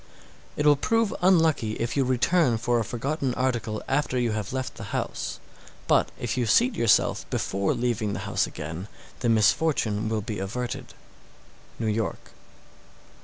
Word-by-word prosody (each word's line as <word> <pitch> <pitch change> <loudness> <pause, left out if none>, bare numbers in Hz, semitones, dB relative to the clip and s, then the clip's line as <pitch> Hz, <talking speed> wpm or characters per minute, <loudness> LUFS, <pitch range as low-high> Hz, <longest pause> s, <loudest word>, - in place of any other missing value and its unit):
_ - - -27 0.5
658. - - -10
It 150 - +3
will 145 - +7
prove 225 +7 +1
unlucky 160 - +3
if 115 +2 -3
you 140 - +3
return 130 +1 +2
for 120 +1 +1
a - - 0
forgotten 130 +3 -2
article 120 -4 -1
after 135 -1 0
you 120 -2 +1
have 105 -2 -3
left 130 0 -3
the - - -8
house; - - -4 0.5
but - - +3
if - - -2
you 125 -2 0
seat 240 - +4
yourself 115 - +2
before 100 0 0
leaving 115 -4 -1
the 100 - -4
house 100 - 0
again, 80 +6 -6 0.3
the 120 - 0
misfortune 110 -1 +2
will 110 -1 -1
be 105 0 -5
averted. 120 +6 -4 0.8
_New 110 -2 0
York. 105 -5 -3
120 Hz, 165 wpm, -26 LUFS, 110-135 Hz, 0.8 s, will